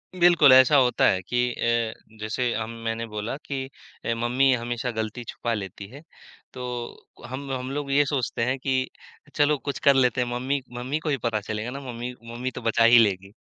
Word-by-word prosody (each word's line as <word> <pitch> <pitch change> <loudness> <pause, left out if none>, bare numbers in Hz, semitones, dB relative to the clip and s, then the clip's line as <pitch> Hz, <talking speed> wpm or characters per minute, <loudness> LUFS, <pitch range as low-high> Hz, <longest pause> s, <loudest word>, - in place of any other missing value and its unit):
बिल्कुल 170 -6 +6
ऐसा 130 +3 +7
होता 125 -2 +3
है 95 - +1
कि 120 +7 -4 0.2
अ, 115 -1 0 0.3
जैसे 120 +3 -1
हम 110 0 -3
मैंने 115 0 -2
बोला 105 +3 -4
कि 135 -2 -3 0.4
अ, 115 - +1
मम्मी 130 +3 +3
हमेशा 120 +1 -2
गलती 110 +1 -4
छुपा 115 +1 -3
लेती 100 -1 -6
है, 140 +7 -12 0.5
तो 125 -2 -6 0.2
हम 135 +3 -6
हम 130 0 -3
लोग 140 0 -3
ये 145 +1 +4
सोचते 135 -4 -1
हैं 130 +2 0
कि 130 -1 0 0.5
चलो 145 0 +3
कुछ 140 -1 -5
कर 140 - +9
लेते 125 -1 +3
हैं, 125 - -1
मम्मी 130 +3 -1 0.2
मम्मी 130 +5 -2
को 155 -1 -4
ही 140 - +1
पता 115 -2 +1
चलेगा 110 +3 -4
ना 140 - -6
मम्मी 120 +1 -5 0.2
मम्मी 125 +2 -4
तो - - -8
बचा 115 0 +2
ही 115 +1 +8
लेगी। 95 -3 +1
125 Hz, 195 wpm, -25 LUFS, 115-135 Hz, 0.5 s, कर